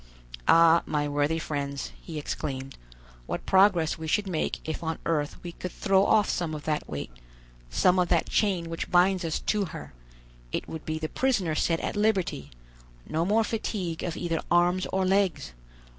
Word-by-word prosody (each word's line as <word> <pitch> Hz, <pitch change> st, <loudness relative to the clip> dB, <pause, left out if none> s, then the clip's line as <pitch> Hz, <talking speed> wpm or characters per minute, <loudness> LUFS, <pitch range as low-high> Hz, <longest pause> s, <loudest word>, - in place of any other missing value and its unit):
"Ah, 165 Hz, 0 st, +6 dB
my 145 Hz, -1 st, 0 dB
worthy 145 Hz, +2 st, +1 dB
friends," 140 Hz, -3 st, -4 dB
he 160 Hz, -3 st, -7 dB
exclaimed, 135 Hz, -2 st, -4 dB, 0.5 s
"what -, -, -4 dB
progress 190 Hz, -5 st, +4 dB
we 160 Hz, -, -5 dB
should 205 Hz, +6 st, +1 dB
make 170 Hz, -4 st, -1 dB
if 160 Hz, -, -3 dB
on 160 Hz, -1 st, -2 dB
earth 150 Hz, -3 st, -1 dB
we 175 Hz, -, -5 dB
could 180 Hz, +1 st, -6 dB
throw 195 Hz, 0 st, +2 dB
off 210 Hz, 0 st, +4 dB
some 165 Hz, -4 st, -2 dB
of 150 Hz, -, -7 dB
that 150 Hz, -1 st, -2 dB
weight, 70 Hz, -4 st, -5 dB, 0.6 s
some 180 Hz, -, +3 dB
of 180 Hz, -, +2 dB
that -, -, +2 dB
chain 190 Hz, -6 st, +1 dB
which 165 Hz, 0 st, -4 dB
binds 180 Hz, +1 st, +3 dB
us 160 Hz, -2 st, -1 dB
to 210 Hz, -2 st, 0 dB
her; 160 Hz, -, -9 dB, 0.6 s
it -, -, -3 dB
would 160 Hz, -1 st, -8 dB
be 155 Hz, 0 st, -1 dB
the 155 Hz, 0 st, -3 dB
prisoner 205 Hz, -8 st, 0 dB
set 165 Hz, +2 st, +1 dB
at -, -, -3 dB
liberty; 195 Hz, -8 st, 0 dB, 0.6 s
no 160 Hz, +1 st, 0 dB
more 215 Hz, +5 st, +3 dB
fatigue 200 Hz, -6 st, -3 dB
of 170 Hz, -2 st, -3 dB
either 165 Hz, -2 st, -1 dB
arms 175 Hz, +1 st, +3 dB
or 190 Hz, 0 st, +1 dB
legs. 185 Hz, -, +1 dB
170 Hz, 175 wpm, -27 LUFS, 155-190 Hz, 0.6 s, Ah